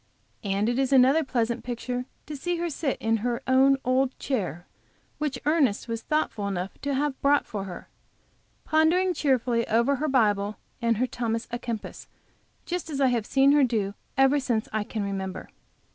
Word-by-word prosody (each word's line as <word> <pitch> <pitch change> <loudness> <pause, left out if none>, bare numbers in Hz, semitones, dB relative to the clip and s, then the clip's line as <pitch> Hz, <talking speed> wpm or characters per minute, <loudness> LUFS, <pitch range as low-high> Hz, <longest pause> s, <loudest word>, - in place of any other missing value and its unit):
And 200 +1 0
it 240 +2 0
is 270 -1 +1
another 270 +4 +5
pleasant 240 -3 -1
picture 245 +1 -4 0.2
to 300 - -6
see 350 +6 -2
her 340 0 -2
sit 280 -2 -2
in 225 0 +1
her 235 +2 -2
own 265 +1 +5
old 255 +1 +1
chair, 180 - -3 0.5
which 295 -4 -1
Ernest 285 -9 +2
was 230 -1 -3
thoughtful 300 -9 -1
enough 190 -1 -3
to 280 -1 -1
have 285 0 -1
brought 285 +1 +3
for 200 -2 -5
her, 180 -3 -8 0.8
pondering 340 +4 +3
cheerfully 250 -6 +1
over 235 +5 +2
her 305 +4 -1
Bible 210 -6 +2 0.2
and 230 -2 +2
her 250 - +2
Thomas 230 -2 -3
a 240 - -3
Kempis 235 -4 -6 0.6
just 355 -2 -4
as 285 -3 -3
I 270 -2 +4
have 235 -3 -1
seen 275 +1 +4
her 290 -1 +5
do 215 -6 0 0.2
ever 270 +2 +4
since 235 -5 -1
I 215 -1 0
can 215 0 -4
remember. 190 -2 -4
250 Hz, 175 wpm, -26 LUFS, 225-280 Hz, 0.8 s, another